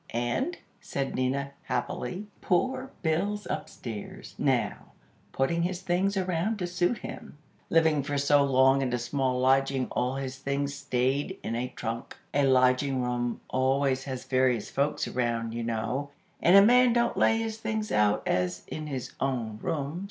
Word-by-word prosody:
"And," 120 Hz, -, -1 dB, 0.2 s
said 135 Hz, -1 st, -3 dB
Nina, 135 Hz, +2 st, -1 dB
happily; 125 Hz, +8 st, -3 dB, 0.2 s
"poor 260 Hz, +8 st, 0 dB
Bill's 195 Hz, +6 st, 0 dB
upstairs, 110 Hz, -4 st, -6 dB
now, -, -, 0 dB, 0.4 s
putting 170 Hz, +6 st, 0 dB
his 180 Hz, +1 st, -1 dB
things 190 Hz, +3 st, +1 dB
around 185 Hz, +3 st, 0 dB
to 180 Hz, -, -2 dB
suit 180 Hz, +5 st, 0 dB
him. 150 Hz, -, -9 dB, 0.3 s
Living 160 Hz, -3 st, +4 dB
for 145 Hz, +1 st, -2 dB
so 140 Hz, 0 st, +4 dB
long 135 Hz, 0 st, +4 dB
in 130 Hz, -2 st, -1 dB
a -, -, +2 dB
small 130 Hz, +1 st, -1 dB
lodging 135 Hz, 0 st, +3 dB
all 125 Hz, +2 st, 0 dB
his 135 Hz, -1 st, -5 dB
things 140 Hz, +1 st, -1 dB
staid 140 Hz, +5 st, -1 dB
in 115 Hz, -, -3 dB
a 120 Hz, +2 st, -1 dB
trunk. 115 Hz, 0 st, -5 dB, 0.2 s
A 140 Hz, -1 st, +3 dB
lodging 130 Hz, 0 st, +3 dB
room 120 Hz, -1 st, -2 dB
always 130 Hz, 0 st, +1 dB
has 130 Hz, -2 st, -5 dB
various 130 Hz, -4 st, +1 dB
folks 140 Hz, +2 st, 0 dB
around, 115 Hz, -2 st, -1 dB
you 120 Hz, 0 st, -3 dB
know, 115 Hz, +5 st, -2 dB, 0.3 s
and 175 Hz, -, +6 dB
a 200 Hz, -, +8 dB
man 245 Hz, +1 st, +6 dB
don't 235 Hz, 0 st, +2 dB
lay 225 Hz, -, +4 dB
his 225 Hz, -1 st, -3 dB
things 220 Hz, -1 st, -2 dB
out 105 Hz, -1 st, +3 dB
as 90 Hz, 0 st, 0 dB
in 155 Hz, -1 st, -5 dB
his 135 Hz, -4 st, -5 dB
own 120 Hz, -5 st, -2 dB
room. 150 Hz, +2 st, -2 dB
135 Hz, 160 wpm, -28 LUFS, 125-175 Hz, 0.4 s, a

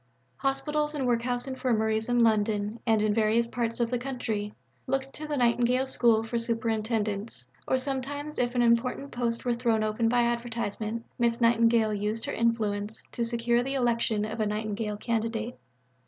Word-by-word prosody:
Hospitals 295 Hz, +3 st, -1 dB
and 275 Hz, -3 st, -1 dB
workhouse 245 Hz, 0 st, 0 dB
Infirmaries 220 Hz, -4 st, 0 dB
in 245 Hz, -1 st, +4 dB
London 215 Hz, 0 st, +1 dB
and 220 Hz, -2 st, +3 dB
in 215 Hz, -1 st, +2 dB
various 225 Hz, +2 st, +3 dB
parts 230 Hz, 0 st, -3 dB
of 235 Hz, 0 st, 0 dB
the 245 Hz, -, 0 dB
country 230 Hz, -5 st, -3 dB, 0.4 s
looked 270 Hz, +1 st, -1 dB
to 305 Hz, -, -7 dB
the 295 Hz, -1 st, -2 dB
Nightingale 245 Hz, +1 st, +2 dB
School 235 Hz, -4 st, +3 dB
for 230 Hz, +1 st, -2 dB
superintendents; 220 Hz, -, -2 dB, 0.2 s
or 260 Hz, -, +2 dB
sometimes 280 Hz, +3 st, -4 dB
if 245 Hz, 0 st, 0 dB
an 245 Hz, -, +3 dB
important 245 Hz, +4 st, +1 dB
post 235 Hz, 0 st, -2 dB
were 245 Hz, -, +2 dB
thrown 235 Hz, -2 st, +1 dB
open 215 Hz, +2 st, +1 dB
by 240 Hz, 0 st, +3 dB
advertisement, 230 Hz, -2 st, -2 dB
Miss 235 Hz, 0 st, +2 dB
Nightingale 230 Hz, -2 st, +4 dB
used 210 Hz, +2 st, -2 dB
her -, -, -3 dB
influence 220 Hz, -2 st, -1 dB
to 235 Hz, -, -2 dB
secure 235 Hz, 0 st, +2 dB
the 270 Hz, +2 st, -3 dB
election 230 Hz, -4 st, +1 dB
of 220 Hz, +1 st, -5 dB
a 215 Hz, -, +1 dB
Nightingale 210 Hz, 0 st, -2 dB
candidate. 230 Hz, +1 st, -2 dB
230 Hz, 165 wpm, -28 LUFS, 220-245 Hz, 0.4 s, in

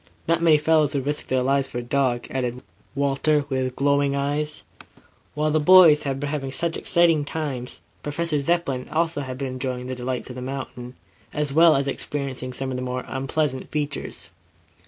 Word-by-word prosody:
"Not 165 Hz, 0 st, +2 dB
many 160 Hz, -2 st, +6 dB
fellows 155 Hz, -1 st, +2 dB
would 135 Hz, -2 st, -1 dB
risk 145 Hz, +1 st, -3 dB
their 130 Hz, -1 st, +1 dB
lives 135 Hz, +1 st, +1 dB
for 120 Hz, -, -7 dB
a 120 Hz, -, -3 dB
dog," 125 Hz, -1 st, 0 dB
added 125 Hz, -1 st, -3 dB, 0.3 s
Walter, 140 Hz, +1 st, +1 dB
with 130 Hz, -1 st, -1 dB
glowing 140 Hz, 0 st, +2 dB
eyes. 145 Hz, +2 st, -2 dB, 0.7 s
While 150 Hz, +1 st, +1 dB
the 155 Hz, -, +3 dB
boys 160 Hz, -2 st, +7 dB
had 135 Hz, -2 st, -2 dB
been 145 Hz, 0 st, -3 dB
having 135 Hz, -3 st, -3 dB
such 165 Hz, +4 st, -2 dB
exciting 165 Hz, -3 st, +3 dB
times, 145 Hz, -5 st, -5 dB, 0.2 s
Professor 150 Hz, 0 st, -1 dB
Zepplin 140 Hz, -5 st, -1 dB
also 165 Hz, -2 st, 0 dB
had 130 Hz, -2 st, -5 dB
been 135 Hz, -1 st, -3 dB
enjoying 125 Hz, -1 st, -4 dB
the 130 Hz, -, -4 dB
delights 125 Hz, 0 st, -4 dB
of -, -, -9 dB
the -, -, -5 dB
mountains, 125 Hz, -1 st, -6 dB, 0.4 s
as 150 Hz, -2 st, -2 dB
well 165 Hz, +1 st, +6 dB
as 135 Hz, 0 st, 0 dB
experiencing 135 Hz, -2 st, -4 dB
some 130 Hz, +1 st, -4 dB
of 130 Hz, -, -3 dB
their 125 Hz, -, -3 dB
more 125 Hz, 0 st, -3 dB
unpleasant 135 Hz, 0 st, -2 dB
features. 145 Hz, -1 st, -4 dB
140 Hz, 180 wpm, -24 LUFS, 130-150 Hz, 0.7 s, boys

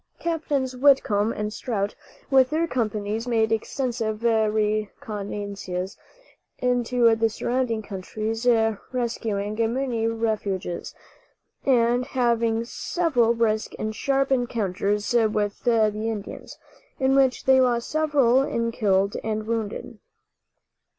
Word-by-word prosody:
Captains 290 Hz, -6 st, -1 dB
Whitcomb 250 Hz, -6 st, +3 dB
and 210 Hz, -1 st, -3 dB
Strout, 205 Hz, -5 st, -2 dB, 0.4 s
with 260 Hz, -1 st, +5 dB
their 320 Hz, +2 st, +1 dB
companies, 220 Hz, -4 st, -2 dB
made 225 Hz, -2 st, +1 dB
extensive 225 Hz, -1 st, -2 dB
reconnoisances 210 Hz, -3 st, -1 dB, 0.6 s
into 245 Hz, -2 st, +2 dB
the 225 Hz, 0 st, +2 dB
surrounding 235 Hz, 0 st, -1 dB
counties, 215 Hz, +4 st, -4 dB, 0.4 s
rescuing 225 Hz, -4 st, -2 dB, 0.2 s
many 240 Hz, -3 st, -1 dB
refugees, 215 Hz, -6 st, -2 dB, 0.7 s
and 245 Hz, -1 st, +3 dB
having 235 Hz, -2 st, +1 dB
several 245 Hz, -5 st, +1 dB
brisk 220 Hz, -2 st, 0 dB
and 215 Hz, 0 st, -3 dB
sharp 275 Hz, +3 st, 0 dB
encounters 210 Hz, -4 st, 0 dB
with 215 Hz, -3 st, +1 dB
the 225 Hz, -3 st, +4 dB
Indians, 215 Hz, -1 st, -5 dB, 0.4 s
in 265 Hz, 0 st, +3 dB
which 270 Hz, -2 st, +2 dB
they 265 Hz, 0 st, +6 dB
lost 240 Hz, -2 st, +1 dB
several 290 Hz, -5 st, +3 dB
in 230 Hz, -4 st, -1 dB
killed 200 Hz, -2 st, +1 dB
and 215 Hz, -1 st, -2 dB
wounded. 225 Hz, -2 st, -4 dB
225 Hz, 105 wpm, -24 LUFS, 215-250 Hz, 0.7 s, they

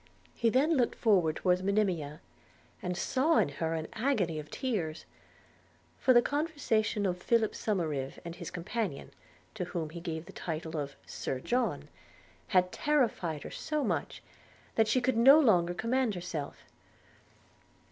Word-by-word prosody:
He 230 Hz, -, +2 dB
then 285 Hz, +7 st, +3 dB
looked 245 Hz, -, +1 dB
forward 185 Hz, -9 st, +3 dB
towards 180 Hz, 0 st, +1 dB
Monimia, 185 Hz, -7 st, 0 dB, 0.6 s
and 180 Hz, -1 st, -3 dB
saw 300 Hz, -, +2 dB
her 165 Hz, -2 st, -2 dB
in 160 Hz, -1 st, -3 dB
a -, -, -12 dB
agony 205 Hz, -, +1 dB
of 150 Hz, -, -9 dB
tears; 190 Hz, -, -3 dB, 0.9 s
for 260 Hz, -, +4 dB
the 240 Hz, -1 st, +6 dB
conversation 285 Hz, -9 st, 0 dB
of 180 Hz, -1 st, -1 dB
Philip 225 Hz, 0 st, +2 dB
Somerive 155 Hz, -10 st, -2 dB
and 170 Hz, 0 st, -6 dB
his -, -, -7 dB
companion, 180 Hz, -3 st, -4 dB, 0.4 s
to 190 Hz, -5 st, -3 dB
whom 165 Hz, -3 st, -4 dB
he 170 Hz, -, -7 dB
gave 165 Hz, -1 st, -5 dB
the -, -, -12 dB
title 160 Hz, -1 st, -5 dB
of 140 Hz, -2 st, -3 dB
Sir 130 Hz, -, -4 dB
John, 245 Hz, -, -1 dB, 0.6 s
had 180 Hz, -2 st, +3 dB
terrified 225 Hz, -, 0 dB
her -, -, -8 dB
so 305 Hz, -2 st, -2 dB
much -, -, -2 dB, 0.5 s
that 225 Hz, -1 st, +3 dB
she 250 Hz, +4 st, +2 dB
could 255 Hz, -1 st, +1 dB
no 270 Hz, +6 st, +8 dB
longer 175 Hz, -, +3 dB
command 230 Hz, +1 st, 0 dB
herself. 170 Hz, -5 st, -5 dB
190 Hz, 145 wpm, -31 LUFS, 165-240 Hz, 0.9 s, no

